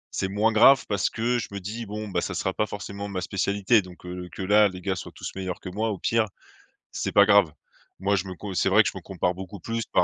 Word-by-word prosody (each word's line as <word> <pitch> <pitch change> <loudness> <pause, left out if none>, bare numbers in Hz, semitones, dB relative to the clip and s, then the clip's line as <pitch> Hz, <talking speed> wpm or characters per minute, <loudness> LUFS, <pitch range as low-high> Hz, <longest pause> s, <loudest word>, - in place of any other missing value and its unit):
c'est 95 - 0
moins 105 +4 +1
grave 115 +4 +6
parce 100 -3 0
que 120 +2 0
je - - -4
me 100 - -5
dis: 110 +5 -6
«Bon, 105 +1 -5
bah, 90 -3 -1
ça 90 - -3
sera 95 +2 -1
pas 110 - 0
forcément 100 0 -6
ma 95 -2 -3
spécialité», 100 +4 +2
donc, 90 -1 -14
heu, 90 0 -6
que - - -6
là, 105 +2 +5
les 90 -2 -7
gars 95 +1 -2
soient 90 - -7
tous - - -6
meilleurs 95 -2 -4
que - - -7
moi, 110 +5 -1
au 105 - -3
pire, 115 +3 +1 0.7
c'est - - -3
pas 100 0 +7
grave. 100 -4 +5 0.5
Moi, 100 +2 +1
je 95 +1 -3
me 95 - -6
co 100 +1 -7
c'est 90 - +1
vrai 100 +3 +6
que - - 0
je - - -9
me - - -7
compare 90 -1 -1
beaucoup 95 +1 -9
plus 115 +4 -2
par - - +5
100 Hz, 270 wpm, -25 LUFS, 95-105 Hz, 0.7 s, pas